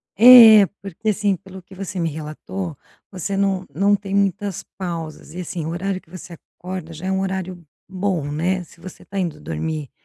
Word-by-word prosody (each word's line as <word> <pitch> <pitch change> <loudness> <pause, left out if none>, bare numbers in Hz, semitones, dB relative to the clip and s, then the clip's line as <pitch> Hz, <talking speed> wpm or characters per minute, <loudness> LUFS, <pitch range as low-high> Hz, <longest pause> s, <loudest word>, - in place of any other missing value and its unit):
É. 230 -1 +10
É. - - +5 0.2
Porque, 200 +3 -4
assim, 205 -1 +1
pelo 190 +1 -12
que 190 - -16
você 190 -1 -6
me 165 -1 0
relatou, 160 +2 -6 0.3
você 195 +1 -4
não 195 -1 0
não 200 +7 +3
tem 195 -1 -6
muitas 200 -1 0
pausas. 165 -4 -6
E, 180 - -7
assim, 170 -2 -5
o - - -3
horário 185 +3 -2
que - - -28
você 180 0 -10 0.2
acorda 180 -2 -7
já 165 +4 -7
é - - 0
um 190 0 0
horário 185 -2 -4 0.2
bom, 185 -4 -1
né. 180 +5 -1
Se 170 - -19
você 185 +1 -11
está 200 - -8
indo 175 -4 -3
dormir 145 - -4
185 Hz, 195 wpm, -21 LUFS, 165-195 Hz, 0.3 s, É